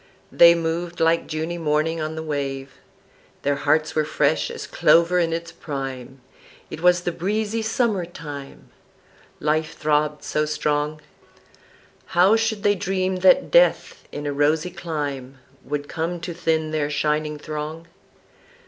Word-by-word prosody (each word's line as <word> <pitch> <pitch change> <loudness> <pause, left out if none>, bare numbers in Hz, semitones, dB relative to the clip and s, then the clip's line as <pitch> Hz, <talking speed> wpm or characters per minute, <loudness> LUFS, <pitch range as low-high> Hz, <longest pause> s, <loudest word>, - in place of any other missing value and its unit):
They 170 0 +7
moved 170 +1 -3
like 165 +1 +2
Juny 160 +2 -3
morning 155 +1 0
on 155 +1 -3
the 160 - -5
wave, 140 -3 -3 0.7
Their 140 0 +1
hearts 155 +2 +1
were 155 - +2
fresh 155 - +1
as - - -6
clover 170 +2 +3
in 165 -1 +1
its 165 0 -4
prime 135 -2 -6 0.5
(It 155 - -7
was 180 0 +4
the 175 - -2
breezy 215 +5 -2
summer 220 -4 0
time), 145 -5 -10 0.7
Life 155 +2 0
throbbed 150 0 0
so 150 0 -1
strong, 150 0 -1 1.2
How 190 +5 +6
should 225 -2 -1
they 205 - +4
dream 185 -1 -1
that 190 +9 +4
Death - - +3
in 145 - -6
a 145 - -1
rosy 155 +5 +1
clime 145 -7 -5 0.3
Would 145 0 -4
come 170 +2 -3
to 170 0 -5
thin 160 -2 0
their 150 -2 -1
shining 150 +1 -1
throng? 155 +2 -6
160 Hz, 140 wpm, -23 LUFS, 150-175 Hz, 1.2 s, They